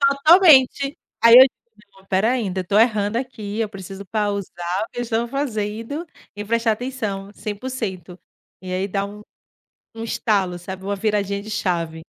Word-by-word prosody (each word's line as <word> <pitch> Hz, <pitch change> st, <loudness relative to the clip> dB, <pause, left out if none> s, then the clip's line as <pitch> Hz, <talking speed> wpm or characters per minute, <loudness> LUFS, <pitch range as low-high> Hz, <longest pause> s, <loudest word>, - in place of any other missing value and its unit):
Totalmente. 280 Hz, -1 st, +5 dB, 0.3 s
Aí 230 Hz, 0 st, +8 dB
eu 255 Hz, -, +12 dB, 0.3 s
digo: 200 Hz, -2 st, -22 dB
"Espera 195 Hz, +4 st, +1 dB
aí, 255 Hz, -, 0 dB
ainda 185 Hz, 0 st, -2 dB
estou 200 Hz, +3 st, +1 dB
errando 215 Hz, -2 st, +2 dB
aqui, 225 Hz, -4 st, -5 dB
eu 220 Hz, -2 st, -1 dB
preciso 195 Hz, 0 st, -9 dB
pausar 200 Hz, -3 st, -2 dB
o -, -, -8 dB
que 245 Hz, -, -7 dB
eu -, -, 0 dB
estou 235 Hz, 0 st, -1 dB
fazendo 235 Hz, +2 st, -3 dB, 0.3 s
e 205 Hz, 0 st, -6 dB
prestar 230 Hz, +1 st, +1 dB
atenção 215 Hz, -5 st, -5 dB
100%". 200 Hz, -5 st, -6 dB, 0.4 s
E 185 Hz, 0 st, -7 dB
aí 190 Hz, +2 st, -1 dB
dá 195 Hz, 0 st, -2 dB
um 205 Hz, +1 st, -10 dB, 0.8 s
um 225 Hz, -, -5 dB
estalo, 195 Hz, -6 st, 0 dB
sabe, 190 Hz, +2 st, -8 dB
uma 200 Hz, +1 st, -2 dB
viradinha 200 Hz, -1 st, -1 dB
de 215 Hz, -, -10 dB
chave. 170 Hz, -5 st, -2 dB
210 Hz, 165 wpm, -21 LUFS, 195-235 Hz, 0.8 s, eu